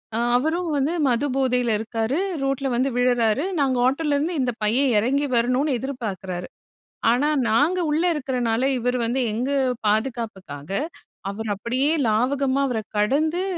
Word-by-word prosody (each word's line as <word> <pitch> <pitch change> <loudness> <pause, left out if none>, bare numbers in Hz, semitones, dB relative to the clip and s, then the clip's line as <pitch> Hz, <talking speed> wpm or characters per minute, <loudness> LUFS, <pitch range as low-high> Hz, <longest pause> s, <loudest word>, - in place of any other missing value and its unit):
அ - - 0 0.2
அவரும் 325 +6 -1
வந்து 280 +4 0
மது 250 +3 +1
போதைல 250 -3 +1
இருக்காரு, 225 +4 -2 0.3
ரோட்ல 275 0 -1
வந்து 255 +3 +1
விழறாரு. 245 0 +2 0.2
நாங்க 265 -2 +2
ஆட்டோலருந்து, 295 +3 0
இந்த 250 -1 0
பையன் 250 +6 +2
இறங்கி 275 +6 +1
வரணுன்னு 255 +4 +2
எதிர்பார்க்குறாரு. 195 -9 -5 0.6
ஆனா 255 +5 +2 0.2
நாங்க 295 +11 +2
உள்ள 310 +3 +1
இருக்கிறனால, 250 -5 -1 0.2
இவரு 250 +1 0
வந்து 250 +3 0
எங்க 245 +5 -2 0.4
பாதுகாப்புக்காக, 210 - -2 0.6
அவரு 220 +2 -5
அப்படியே 255 +8 0 0.2
லாவகமா 265 +5 +1
அவர 230 -3 -1 0.2
கடந்து, 310 - +1
255 Hz, 130 wpm, -23 LUFS, 225-280 Hz, 0.6 s, விழறாரு